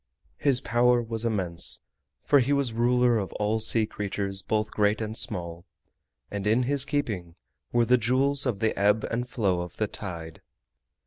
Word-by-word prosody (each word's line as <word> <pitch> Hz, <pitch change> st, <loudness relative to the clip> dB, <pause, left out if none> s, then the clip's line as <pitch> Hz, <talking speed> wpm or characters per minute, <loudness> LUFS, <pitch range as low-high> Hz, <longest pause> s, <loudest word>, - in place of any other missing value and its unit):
His 135 Hz, -4 st, +2 dB
power 120 Hz, +1 st, +3 dB
was 115 Hz, -1 st, -2 dB
immense, 95 Hz, -7 st, 0 dB, 0.4 s
for 145 Hz, -, +4 dB
he 135 Hz, +3 st, +1 dB
was 140 Hz, -3 st, +2 dB
the 115 Hz, -, -9 dB
ruler 120 Hz, -1 st, +3 dB
of 95 Hz, -, -4 dB
all 105 Hz, +1 st, 0 dB
sea 110 Hz, 0 st, +2 dB
creatures 100 Hz, -2 st, -3 dB
both 110 Hz, +1 st, -1 dB
great 105 Hz, +1 st, +1 dB
and 110 Hz, -1 st, -4 dB
small, 85 Hz, -6 st, -3 dB, 0.7 s
and 100 Hz, 0 st, -3 dB
in 115 Hz, +4 st, +3 dB
his 140 Hz, +1 st, +4 dB
keeping 100 Hz, -, -3 dB, 0.4 s
were 120 Hz, -1 st, +3 dB
the 125 Hz, +1 st, +4 dB
Jewels 135 Hz, +4 st, +1 dB
of 110 Hz, -4 st, -2 dB
the 110 Hz, -, +1 dB
Ebb 105 Hz, +2 st, +3 dB
and 125 Hz, +2 st, -2 dB
Flow 95 Hz, -7 st, 0 dB
of 90 Hz, -1 st, -8 dB
the 110 Hz, -, +1 dB
Tide. 85 Hz, -6 st, -7 dB
110 Hz, 175 wpm, -26 LUFS, 100-125 Hz, 0.7 s, for